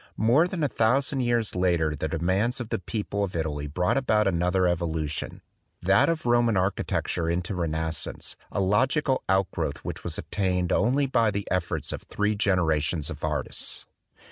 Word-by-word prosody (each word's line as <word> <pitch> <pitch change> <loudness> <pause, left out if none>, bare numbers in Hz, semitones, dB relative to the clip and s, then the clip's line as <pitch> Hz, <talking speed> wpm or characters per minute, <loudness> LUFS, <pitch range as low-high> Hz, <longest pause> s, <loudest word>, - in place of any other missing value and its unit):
More 125 +10 +4
than 180 -3 -3
a - - +4
thousand 130 +3 +1
years 120 -3 +1
later 85 -4 +1
the 75 - -2
demands 95 - 0
of 120 -3 -5
the - - -1
people 100 +1 -3
of 95 -3 -4
Italy 75 -3 -2
brought 90 - 0
about 110 -5 +2
another 90 +1 +2
evolution, 80 -4 -2 0.4
that 95 - +4
of 165 -4 -1
Roman 120 -3 +3
architecture 90 -2 -1
into 90 +3 -1
Renascence, 80 -2 -2 0.2
a - - -2
logi 125 +10 +2
cal 130 -2 +1
outgrowth 95 -1 0
which - - -5
was - - -3
attained 90 -3 -1
only 130 +6 +2
by 115 -4 +2
the 100 -1 -3
efforts 90 -2 -1
of - - -5
three 105 0 -1
generations 85 -6 +1
of 75 - -8
artists. 75 -4 -3
95 Hz, 165 wpm, -26 LUFS, 85-115 Hz, 0.4 s, More